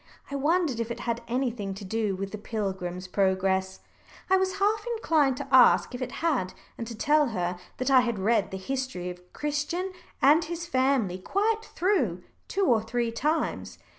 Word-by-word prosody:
I - - -3
wondered 295 -2 +1
if 230 0 -2
it 235 0 -5
had 235 -1 -2
anything 235 -6 -2
to 200 +1 -8
do 210 0 -1
with 195 +1 -5
the 215 - -6
pilgrim's 190 -4 -4
progress, 190 0 0 0.5
and - - +7
I - - +5
was 380 0 0
half 420 +2 +1
inclined 300 - +2
to - - -5
ask 255 0 +6
if 245 - -6
it 255 - -4
had, 250 - 0 0.2
and 230 - -6
to 230 - -6
tell 295 +6 +3
her 180 -5 -2 0.2
that 255 +2 0
I 265 - +8
had 235 -3 -1
read 205 +2 +2
the 190 - -5
history 190 -4 -3
of 180 0 -14
Christian 300 +6 -2 0.3
and 300 +5 +5
his 340 +1 -5
family 260 - +1
quite 435 - 0
through, 260 - +1 0.2
two 395 0 0
or 235 -7 +4
three 230 +1 -1
times. 300 +8 -1
240 Hz, 185 wpm, -27 LUFS, 195-300 Hz, 0.5 s, I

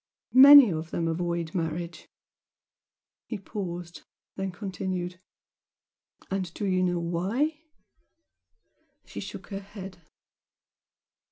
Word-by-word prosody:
Many 275 -3 +10
of 160 0 -4
them 165 0 -2
avoid 170 0 -2
marriage 170 0 -4 0.6
" - - -67
he 225 - -4
paused, 180 -3 -6 0.3
then 195 0 -3
continued 180 -2 -5 1.1
"and 190 -3 -2
do 210 - -3
you 185 -1 +1
know 180 -1 +1
why?" 205 - -1 1.4
She 100 - -8
shook 185 - -8
her 195 -2 -4
head. 195 -2 -10
185 Hz, 100 wpm, -27 LUFS, 170-195 Hz, 1.4 s, Many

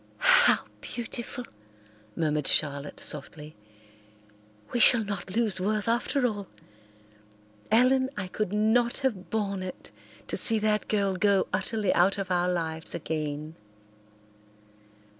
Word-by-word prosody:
"How - - +5 0.2
beautiful!" 240 +1 -5 0.7
murmured 150 -3 -1
Charlotte 145 -1 0
softly. 150 +1 -6 1.2
"We 240 - 0
shall 235 -1 +7
not 200 -2 -6
lose 215 -5 +2
Worth 210 +2 -1
after 245 +3 0
all. 205 -5 -2 1.2
Ellen, 260 +3 +3
I 190 - -2
could 190 +1 -3
not 220 +3 +2
have 190 -9 -2
borne 200 -2 -2
it 185 -1 -8 0.3
to - - -3
see 225 - +3
that 215 0 0
girl 200 -3 0
go 200 0 +2
utterly 205 +3 0
out 190 +3 +3
of 195 -2 -4
our 180 0 +1
lives 160 -2 -2
again." 155 -2 -4
200 Hz, 120 wpm, -27 LUFS, 175-225 Hz, 1.2 s, shall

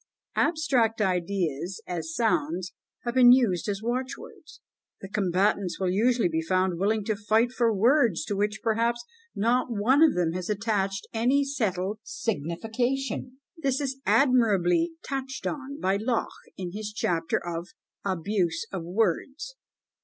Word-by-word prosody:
Abstract 265 -9 +2
ideas, 180 -3 -1
as 165 -2 -4
sounds, 180 -4 0 0.3
have 240 - -2
been 245 -1 +8
used 225 -7 +3
as 200 +1 -3
watchwords. 260 - -5 0.4
The 195 - -8
combatants 195 -1 0
will 185 -2 0
usually 230 +2 +2
be 160 -1 -1
found 185 +1 0
willing 210 +2 +1
to 215 - 0
fight 220 +3 +2
for 235 -3 +2
words 230 - +3
to 205 - -2
which, 210 +1 -1
perhaps, 235 +1 0 0.3
not 235 +5 +2
one 235 +7 +3
of 320 -2 +6
them 175 -2 +1
has 180 +2 -4
attached 200 -2 -1
any 255 +5 +2
settled 210 -7 -2
signification. 240 - -3 0.2
This 275 -5 0
is 270 -2 -3
admirably 250 - +3
touched 265 -1 -4
on 280 0 -4
by 190 +1 +1
Locke, 230 +2 -1 0.3
in 180 -2 -5
his 210 +2 -5
chapter 170 -6 0
of 170 0 -5 0.4
"Abuse 185 -1 -1
of 190 - -3
Words." 225 - -1
215 Hz, 140 wpm, -27 LUFS, 185-250 Hz, 0.4 s, been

